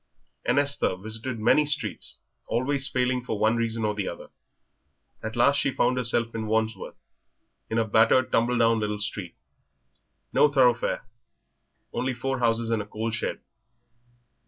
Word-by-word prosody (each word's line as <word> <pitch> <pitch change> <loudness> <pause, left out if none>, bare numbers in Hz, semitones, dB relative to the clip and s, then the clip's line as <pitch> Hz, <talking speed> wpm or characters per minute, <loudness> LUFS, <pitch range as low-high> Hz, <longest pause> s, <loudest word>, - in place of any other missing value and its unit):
And - - +1
Esther 145 -9 +3
visited 110 +5 -4
many 150 +7 +4
streets, 145 - 0 0.3
always 135 +3 0
failing 125 -2 0
for 110 -4 -3
one 110 +2 +2
reason 115 -1 -1
or 105 - 0
another. 95 -3 -5 0.9
At 110 0 -5
last 140 +4 +4
she 140 - +1
found 125 -1 +1
herself 115 -1 0
in 110 -1 -4
Wandsworth, 110 -2 -2 0.7
in 110 - -1
a 115 - +2
battered 115 +4 +3
tumble 120 +2 +2
down 115 -1 +3
little 105 -1 -2
street, 100 -4 -4 1.0
no - - +5
thoroughfare, 125 -5 +2 0.9
only 130 0 -2
four 135 +2 -2
houses 115 -1 +1
and 115 -2 +1
a - - -7
coal 110 +2 -3
shed. 115 - -3
115 Hz, 145 wpm, -26 LUFS, 110-125 Hz, 1.0 s, no